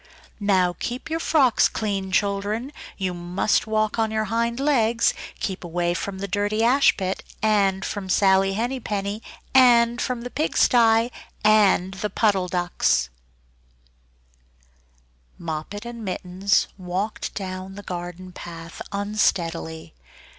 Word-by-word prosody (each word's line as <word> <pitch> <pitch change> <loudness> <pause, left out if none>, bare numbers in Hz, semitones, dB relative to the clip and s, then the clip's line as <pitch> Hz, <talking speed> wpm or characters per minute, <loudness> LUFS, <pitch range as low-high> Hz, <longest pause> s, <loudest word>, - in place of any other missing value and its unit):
"Now 185 -4 +2
keep 250 +6 -5
your 325 - 0
frocks 280 -7 +3
clean, 195 -3 -3
children! 205 +6 -1 0.2
You 185 -2 -2
must 175 +5 0
walk 215 0 0
on 220 -1 +2
your 220 0 0
hind 235 +1 0
legs. 235 -5 +2 0.3
Keep 190 -2 -3
away 175 0 -1
from 190 +2 -4
the 200 +1 -4
dirty 205 +3 0
ash 265 +4 +4
pit, 190 -1 -3 0.2
and 200 -3 +2
from 205 -3 -5
Sally 195 0 +4
Henny 240 +6 -2
Penny, 205 -1 -3 0.3
and 240 -2 +5
from 250 -2 -2
the 245 +1 -7
pig 310 - -1
stye 230 -1 +4 0.3
and 200 -3 +4
the 205 +2 -3
Puddle 195 -2 +1
Ducks." 175 - +1 2.3
Moppet 170 +6 -5
and 235 -1 -7
Mittens 190 0 0
walked 185 +4 -3
down 190 -1 -5
the 205 - -9
garden 180 0 -6
path 165 -1 -9
unsteadily. 175 - -1
200 Hz, 125 wpm, -23 LUFS, 185-225 Hz, 2.3 s, and